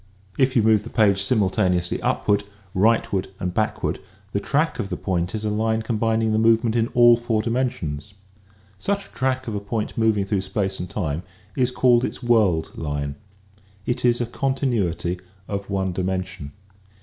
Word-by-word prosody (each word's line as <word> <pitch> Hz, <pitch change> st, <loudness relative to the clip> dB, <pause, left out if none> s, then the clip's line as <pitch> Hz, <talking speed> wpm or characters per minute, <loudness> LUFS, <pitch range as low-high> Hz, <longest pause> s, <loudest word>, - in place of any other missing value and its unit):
If 130 Hz, -1 st, +2 dB
you 115 Hz, -, +4 dB
move 110 Hz, -1 st, +4 dB
the -, -, -9 dB
page 100 Hz, -3 st, +3 dB
simultaneously 95 Hz, -4 st, +1 dB
upward, 105 Hz, -1 st, +1 dB, 0.3 s
rightward 100 Hz, -1 st, +2 dB
and 90 Hz, -2 st, -2 dB
backward 110 Hz, +2 st, -1 dB, 0.3 s
the 100 Hz, -, 0 dB
track 150 Hz, +8 st, 0 dB
of 100 Hz, -4 st, -2 dB
the -, -, -3 dB
point 90 Hz, 0 st, -1 dB
is 110 Hz, 0 st, -3 dB
a 105 Hz, -, 0 dB
line 110 Hz, +1 st, 0 dB
combin 115 Hz, 0 st, 0 dB
ing 110 Hz, -, +1 dB
the 110 Hz, -, +2 dB
movement 115 Hz, 0 st, +3 dB
in 115 Hz, -1 st, +2 dB
all 120 Hz, -1 st, +8 dB
four 115 Hz, -2 st, -1 dB
dimensions. 105 Hz, -, -2 dB, 0.6 s
Such 200 Hz, -, -1 dB
a -, -, -18 dB
track 130 Hz, -1 st, -1 dB
of 110 Hz, -, -3 dB
a 100 Hz, -, -1 dB
point 105 Hz, +2 st, -3 dB
moving 110 Hz, -3 st, +2 dB
through 95 Hz, -1 st, 0 dB
space 95 Hz, 0 st, -2 dB
and 90 Hz, -, -5 dB
time 80 Hz, -6 st, -2 dB, 0.3 s
is 125 Hz, -1 st, +2 dB
called 125 Hz, -1 st, +3 dB
its -, -, -4 dB
"world 105 Hz, -9 st, +2 dB
line." 70 Hz, -2 st, -3 dB, 0.7 s
It 125 Hz, +1 st, -1 dB
is 120 Hz, -1 st, +3 dB
a 120 Hz, -, 0 dB
continuity 115 Hz, -, -1 dB, 0.3 s
of 100 Hz, -1 st, -4 dB
one 95 Hz, -1 st, 0 dB
dimension. 90 Hz, -4 st, -3 dB
110 Hz, 175 wpm, -23 LUFS, 95-120 Hz, 0.7 s, all